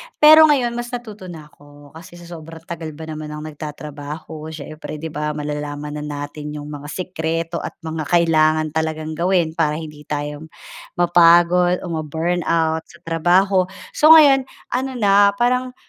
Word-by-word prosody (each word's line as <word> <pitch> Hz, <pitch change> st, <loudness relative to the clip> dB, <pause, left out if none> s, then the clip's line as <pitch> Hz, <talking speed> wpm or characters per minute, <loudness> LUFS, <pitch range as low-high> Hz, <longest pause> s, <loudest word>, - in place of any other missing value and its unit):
Pero 310 Hz, +1 st, +8 dB
ngayon, 260 Hz, -5 st, +2 dB
mas 240 Hz, 0 st, -5 dB
natuto 215 Hz, -6 st, -9 dB
na 160 Hz, -3 st, -9 dB
ako 145 Hz, 0 st, -18 dB
kasi 165 Hz, +2 st, -13 dB
sa 175 Hz, -, -13 dB
sobrang 165 Hz, -1 st, -11 dB
tagal 165 Hz, -1 st, -7 dB
ba 160 Hz, -, -9 dB
naman 155 Hz, -1 st, -7 dB
ng 150 Hz, 0 st, -7 dB
nagtatrabaho 150 Hz, +1 st, -8 dB
siyempre 155 Hz, 0 st, -8 dB
'di 160 Hz, +1 st, -6 dB
ba, 150 Hz, 0 st, -3 dB
malalaman 150 Hz, 0 st, -5 dB
na -, -, -6 dB, 0.2 s
natin 150 Hz, +1 st, -7 dB
yung 150 Hz, 0 st, -7 dB
mga 145 Hz, 0 st, -8 dB
sikreto 165 Hz, -1 st, -3 dB
at -, -, -7 dB
mga 160 Hz, -2 st, -4 dB
kailangan 155 Hz, -2 st, +2 dB
talagang 160 Hz, 0 st, -3 dB
gawin 170 Hz, 0 st, +1 dB
para 160 Hz, -2 st, 0 dB
hindi 150 Hz, -2 st, -9 dB
tayo, 150 Hz, +1 st, -5 dB, 0.5 s
mapagod 175 Hz, +1 st, +4 dB
o 175 Hz, -, -5 dB
ma-burnout 160 Hz, 0 st, -1 dB
sa 170 Hz, -, -17 dB
trabaho. 180 Hz, +3 st, +2 dB, 0.2 s
So, 315 Hz, +2 st, +7 dB
ngayon 275 Hz, -4 st, +6 dB, 0.2 s
ano 260 Hz, +2 st, -1 dB
na 200 Hz, -2 st, +4 dB
parang, 250 Hz, +2 st, 0 dB
160 Hz, 155 wpm, -20 LUFS, 150-180 Hz, 0.5 s, Pero